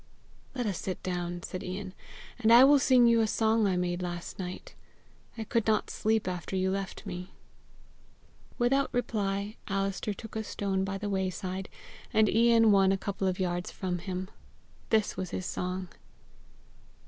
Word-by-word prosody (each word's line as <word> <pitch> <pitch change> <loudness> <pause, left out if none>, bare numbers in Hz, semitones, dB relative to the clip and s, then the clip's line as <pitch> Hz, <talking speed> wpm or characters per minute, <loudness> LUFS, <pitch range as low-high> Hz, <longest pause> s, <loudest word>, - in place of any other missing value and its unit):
"Let 245 -2 -1
us 200 -5 -2
sit 185 - -4
down," 175 -1 -3
said 185 - -5
Ian, 185 +1 -5 0.5
"and 225 -1 +3
I 240 +2 +10
will 285 +1 +7
sing 255 -2 +5
you 230 -1 +5
a 220 - +2
song 220 0 +2
I 185 -2 +1
made 180 0 -1
last 175 0 -5
night; 180 -1 -6 0.6
I 225 - -3
could 225 +1 0
not 215 -1 +1
sleep 220 -2 0
after 180 +1 -4
you 190 0 +1
left 195 +2 -4
me." 180 -2 -7 1.2
Without 270 +3 +2
reply, 205 -3 -1
Alister 195 +1 -1
took 220 +2 -10
a 220 - -2
stone 195 -2 -1
by 195 0 -3
the 205 +1 -4
wayside, 190 -1 -2 0.4
and 220 0 +4
Ian 225 0 +5
one 195 -1 +5
a 195 - +2
couple 195 -1 -2
of 185 0 -1
yards 175 -1 -1
from 180 -2 -3
him. 185 +1 -5 0.6
This 220 -2 +2
was 185 -1 -4
his 185 - -4
song. 185 0 -3
195 Hz, 165 wpm, -29 LUFS, 185-220 Hz, 1.2 s, I